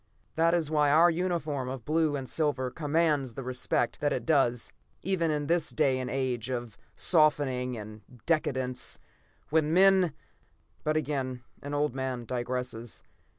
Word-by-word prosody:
That 165 +1 +3
is 160 -3 -1
why 150 -2 +3
our 165 +4 +6
uniform 160 -6 -2
of 130 -3 -6
blue 155 -1 +1
and 135 -2 -4
silver 140 -5 0
commands 150 -4 0
the 135 - -5
respect 125 -1 -1
that 145 - +1
it - - -2
does 130 -7 +2 0.3
even 180 -4 0
in 150 -1 -1
this 170 +1 +1
day 135 -4 +1
and 130 -1 -3
age 130 -2 -2
of 120 -4 -4 0.2
softening 140 -6 +2
and 110 0 -9 0.2
decadence, 130 -6 0 0.5
when 155 -1 +2
men 190 -2 +5 0.7
but 155 0 +1
again 130 -5 -2 0.2
an 145 +1 -4
old 145 -3 +1
man 130 -2 -3
digresses. 125 -1 -4
145 Hz, 150 wpm, -29 LUFS, 125-155 Hz, 0.7 s, our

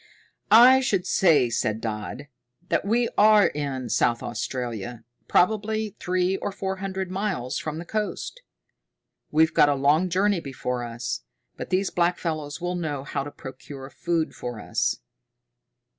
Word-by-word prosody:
"I 245 +5 +8
should 205 -9 0
say," 150 -10 +3
said 110 -1 0
Dodd, 110 +5 -5 0.4
"that - - +1
we 235 +3 +2
are 210 -1 +7
in 140 -5 -2
South 120 -1 +1
Australia, 120 -1 -4 0.2
probably 215 +2 +1
three 185 +1 0
or 205 - -3
four 190 -1 -4
hundred 190 -1 -4
miles 190 -11 -2
from 155 0 -4
the 170 - -6
coast. 215 - -4 0.9
We've 160 +1 +3
got 145 - +5
a 145 - +2
long 150 +6 +3
journey 195 +2 +2
before 125 -4 -4
us, 115 - -4 0.3
but - - -7
these 185 +1 +1
blackfellows 165 -4 -1
will 175 0 -2
know 155 -6 -3
how 140 0 -3
to 145 - -6
procure 135 0 -10
food 165 -2 -1
for 120 -3 -6
us." 80 - -1
160 Hz, 145 wpm, -25 LUFS, 130-195 Hz, 0.9 s, I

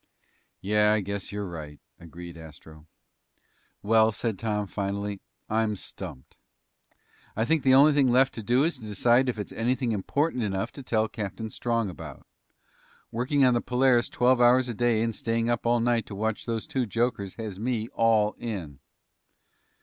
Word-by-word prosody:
"Yeah, 105 +2 +3
I 110 - +1
guess 100 0 -5
you're 100 -1 -4
right," 75 -4 -8 0.2
agreed 85 0 -10
Astro. 80 -1 -13 1.0
"Well," 110 +1 +4
said 110 -2 -3
Tom 105 -2 -1
finally, 100 0 -4 0.3
"I'm 110 -1 0
stumped. 80 -8 -8 1.0
I 110 - 0
think 160 +3 +2
the 130 -1 +5
only 145 +3 +7
thing 140 -3 +3
left 130 +2 +4
to 115 - -6
do 120 +5 +2
is 160 -4 -1
to - - -13
decide 120 +5 +2
if 120 - -3
it's 105 - -5
anything 125 +1 -1
important 125 +7 -1
enough 95 -3 -2
to 140 - -10
tell 110 -4 0
Captain 110 +1 -6
Strong 115 -2 -1
about. 80 - -10 0.9
Working 130 +4 +2
on 125 - +4
the 120 - +1
Polaris 125 -1 +2
twelve 125 0 +2
hours 125 +1 +5
a 120 - -3
day 115 -1 +1
and 115 -1 -1
staying 115 +1 -1
up 120 0 -1
all 120 0 +3
night 120 -1 +1
to 100 - -7
watch 110 +3 -2
those 115 -2 -2
two 130 -3 -2
jokers 105 -3 -1
has 105 -4 -6
me 115 -1 -2
all 110 -5 +2
in." 90 - -6
115 Hz, 170 wpm, -27 LUFS, 100-120 Hz, 1.0 s, only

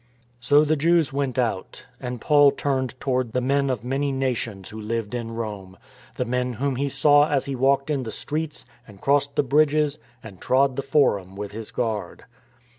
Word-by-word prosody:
So 145 +5 +4
the 155 +1 +2
Jews 160 -1 +2
went 140 -2 -2
out; 115 -7 -2
and 125 -2 -5
Paul 145 +2 +5
turned 130 -3 -2
toward 130 -3 -1
the 125 - +1
men 140 +2 +1
of 125 -4 -2
many 135 +3 -1
nations 120 -7 -3
who 110 0 -8
lived 115 0 -3
in 120 -2 -3
Rome, 100 -4 -6 0.4
the 125 - -2
men 125 +1 -1
whom 130 +2 -2
he 140 +1 -1
saw 145 +2 +4
as 140 -3 +1
he 140 -1 -3
walked 135 +3 +2
in 140 -3 0
the 120 - -5
streets 155 +6 -3 0.2
and 100 -3 -15
crossed 140 +2 +1
the - - +3
bridges 150 +1 +2 0.2
and 100 -5 -12
trod 135 0 +2
the 140 - -2
Forum 125 -10 +1
with 100 0 -6
his 110 +1 -7
guard. 110 -6 -3
130 Hz, 190 wpm, -24 LUFS, 115-140 Hz, 0.4 s, Paul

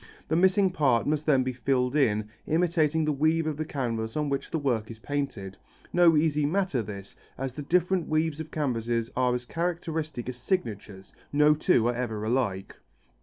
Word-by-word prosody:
The 160 - +1
missing 190 +2 +4
part 130 -9 +2
must 150 +1 -1
then 135 -4 +4
be 130 0 -2
filled 125 +1 0
in, 110 -7 +2 0.2
imitating 160 -2 +2
the 155 - +1
weave 155 +3 +1
of 155 -1 -1
the 155 - -2
canvas 115 -5 -3
on 150 -1 0
which 140 0 -2
the - - -1
work 120 -7 -1
is 115 - -8
painted. 115 -7 -4 0.4
No 170 -3 +5
easy 150 -1 +2
matter 170 -3 0
this, 100 -2 -8 0.2
as 135 -1 -4
the 150 - -6
different 180 +3 +1
weaves 155 0 0
of 160 -1 -6
canvases 120 -6 -1
are 125 -1 +2
as 125 0 -4
characteristic 165 -5 -3
as 125 -1 -5
signatures: 110 - -4 0.2
no 150 +1 +5
two 150 -6 +2
are 120 - +1
ever 115 -4 -3
alike. 110 -5 -1
145 Hz, 180 wpm, -27 LUFS, 120-160 Hz, 0.4 s, No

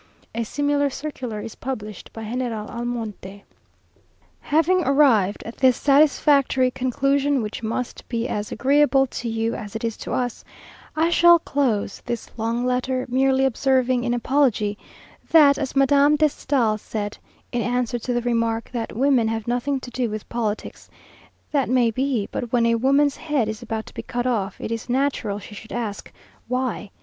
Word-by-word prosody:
A 230 - -1
similar 285 +4 0
circular 260 -6 -5
is 225 - -7
published 215 -6 -6
by 225 - -8
General 225 -1 -3
Almonte. 220 -5 -5 1.0
Having 335 +4 +2
arrived 255 -9 +3
at 230 - -8
this 260 -2 +4
satisfactory 280 -2 +3
conclusion, 275 +1 +1
which 210 +1 -5
must 230 +2 -4
be 235 0 -1
as 205 0 -3
agreeable 280 0 +3
to 245 -2 -5
you 225 +1 -1
as 210 -1 -7
it 220 - -4
is 230 -1 -1
to - - -7
us, 245 -1 -2 0.5
I 325 +2 +2
shall 345 0 +7
close 270 -10 -1
this 240 -2 -5
long 230 +2 -1
letter, 255 +1 0
merely 265 +1 +3
observing, 260 -1 +2
in 240 -1 0
apology, 240 -5 +1 0.5
that 290 -3 +6
as 280 -2 -3
Madame 280 +2 +5
de 305 0 +3
Stael 235 -7 0
said, 205 -1 -5 0.3
in 240 - -1
answer 245 0 -1
to 245 - -4
the 240 0 0
remark, 230 -1 -1
that 230 -3 -4
"Women 260 -3 +3
have 225 0 -3
nothing 250 +3 0
to 245 - -9
do 245 -1 -1
with 215 0 -6
politics;" 220 -3 -4 0.6
"That 280 -5 +1
may 245 -2 +3
be, 255 -3 -1
but 240 -2 -4
when 240 -2 +3
a 230 - +3
woman's 275 +4 +2
head 295 -8 0
is 220 +2 -5
about 225 -2 -4
to - - -14
be - - -5
cut 245 0 -3
off, 210 -6 -1
it - - -5
is 230 +1 -4
natural 250 -5 0
she 210 +1 -10
should 220 +2 -11
ask 220 -4 -4 0.4
why?" 250 -4 -2
245 Hz, 170 wpm, -23 LUFS, 225-275 Hz, 1.0 s, shall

